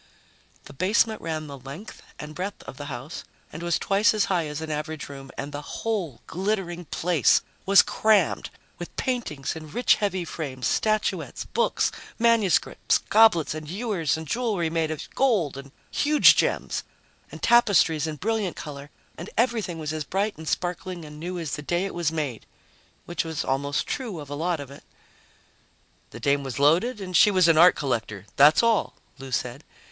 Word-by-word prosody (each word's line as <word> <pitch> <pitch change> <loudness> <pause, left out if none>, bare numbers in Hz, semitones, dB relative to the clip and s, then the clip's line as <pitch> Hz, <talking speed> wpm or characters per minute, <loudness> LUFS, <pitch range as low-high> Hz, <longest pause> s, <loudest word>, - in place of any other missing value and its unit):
The - - -13
basement 210 - +1
ran 155 -1 -3
the 140 -2 -9
length 140 - -10 0.2
and 150 0 -8
breadth 190 +5 -5
of - - -10
the 145 - -7
house 135 +3 -7 0.3
and 165 - -7
was 170 -1 +1
twice 205 +3 +2
as 210 - +2
high 170 -4 0
as 150 0 -5
an 160 -1 -5
average 155 0 -4
room, 135 -1 -10
and 140 +1 -5
the 145 0 -5
whole 180 - -4
glittering 180 -2 -2
place 170 -1 +2 0.2
was 195 -1 +8
crammed 215 -1 +2 0.3
with - - -8
paintings 225 - -2
in 155 -1 -9
rich, 245 +11 +3
heavy 190 -4 -1
frames, 135 -6 -5
statuettes, 215 -1 0
books, 475 - 0 0.3
manuscripts, 230 -6 +2
goblets 215 -9 +4
and 155 -1 -7
ewers 190 - -1
and 160 - -7
jewelry 205 - -1
made 165 -1 0
of 155 -2 -5
gold 210 - +1
and 140 0 -9 0.2
huge 300 0 +5
gems, - - 0 0.5
and - - -11
tapestries 200 -9 +4
in 155 - -4
brilliant 210 +1 -1
color... 145 -1 -8 0.3
and 170 - -7
everything 225 -7 0
was 155 -1 -4
as 155 -1 -3
bright 200 +7 -1
and 160 0 -10
sparkling 180 0 -3
and 150 0 -11
new 180 +3 -4
as 165 -4 -4
the 150 - -7
day 175 +5 -1
it 195 - -5
was 170 -2 0
made, 145 -8 -4 0.6
which 175 - -2
was 160 -2 -4
almost 140 +1 -1
true 230 - -4
of 145 -1 -9
a - - -2
lot 165 +2 -1
of 140 -1 -8
it. 140 - -13 1.3
"The - - -10
dame 140 0 +1
was 135 -3 -5
loaded 175 - +3
and 185 -2 -5
she 210 - +7
was 185 -4 +4
an 165 -1 +5
art 180 +1 +8
collector, 110 -7 -3
that's 150 +9 +6
all," 230 -2 +2 0.2
Lou 135 -1 -9
said. 120 0 -3
165 Hz, 180 wpm, -25 LUFS, 145-200 Hz, 1.3 s, was